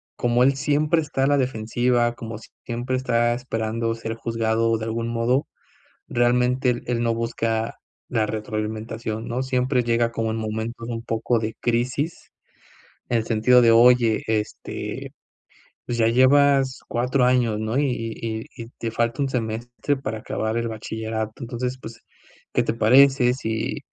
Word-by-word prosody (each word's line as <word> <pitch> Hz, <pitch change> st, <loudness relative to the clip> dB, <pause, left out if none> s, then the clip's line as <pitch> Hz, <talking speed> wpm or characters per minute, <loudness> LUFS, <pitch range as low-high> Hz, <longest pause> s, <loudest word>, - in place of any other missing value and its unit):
como 120 Hz, +1 st, +2 dB
él 135 Hz, +1 st, +5 dB
siempre 150 Hz, +3 st, +2 dB
está 140 Hz, -3 st, -2 dB
a 135 Hz, -, +3 dB
la 145 Hz, 0 st, +3 dB
defensiva, 120 Hz, 0 st, +1 dB
como 115 Hz, -2 st, -7 dB, 0.3 s
siempre 120 Hz, +2 st, -3 dB
está 120 Hz, -2 st, +1 dB
esperando 115 Hz, -2 st, -2 dB
ser 115 Hz, 0 st, -5 dB
juzgado 115 Hz, 0 st, 0 dB
de 110 Hz, -, -5 dB
algún 115 Hz, +1 st, -2 dB
modo, 120 Hz, +4 st, +1 dB, 0.6 s
realmente 125 Hz, +2 st, +2 dB
él 120 Hz, -1 st, -1 dB
él 120 Hz, -1 st, 0 dB
no 115 Hz, -, +2 dB
busca 115 Hz, -1 st, -2 dB, 0.3 s
la 110 Hz, -1 st, +1 dB
retroalimentación, 110 Hz, +1 st, -4 dB
¿no? 125 Hz, +2 st, -2 dB
Siempre 125 Hz, -1 st, +1 dB
llega 115 Hz, 0 st, +1 dB
como 115 Hz, -1 st, -1 dB
en 115 Hz, -, -3 dB
momento 110 Hz, +2 st, -4 dB
de 120 Hz, -, -4 dB
un 115 Hz, 0 st, -5 dB
poco 115 Hz, 0 st, 0 dB
de 110 Hz, 0 st, -4 dB
crisis, 125 Hz, +7 st, -1 dB, 0.8 s
en 120 Hz, -, +2 dB
el 110 Hz, -, -2 dB
sentido 120 Hz, +2 st, +4 dB
de: 115 Hz, -, +6 dB
"Oye, 120 Hz, -1 st, +5 dB
este, 110 Hz, -1 st, -4 dB, 0.7 s
pues 120 Hz, -1 st, -3 dB
ya 110 Hz, -, +4 dB
llevas 135 Hz, +2 st, +4 dB
4 125 Hz, +2 st, +1 dB
años, 120 Hz, -4 st, +2 dB
¿no? 110 Hz, +4 st, -1 dB
Y 145 Hz, -, +2 dB
y 115 Hz, -1 st, -4 dB, 0.2 s
y 115 Hz, -, -5 dB
y -, -, -11 dB
te 115 Hz, -, -2 dB
falta 120 Hz, +4 st, -1 dB
un 135 Hz, -, +1 dB
semestre 120 Hz, +3 st, -2 dB
para 110 Hz, -4 st, -4 dB
acabar 110 Hz, +1 st, -3 dB
el 115 Hz, 0 st, -1 dB
bachillerato. 110 Hz, 0 st, -4 dB
Entonces, 125 Hz, +1 st, -3 dB
pues, 115 Hz, -2 st, -10 dB, 0.5 s
¿qué -, -, +2 dB
te -, -, -1 dB
parece 125 Hz, +2 st, +5 dB
si 110 Hz, -3 st, -3 dB
115 Hz, 160 wpm, -23 LUFS, 110-125 Hz, 0.8 s, de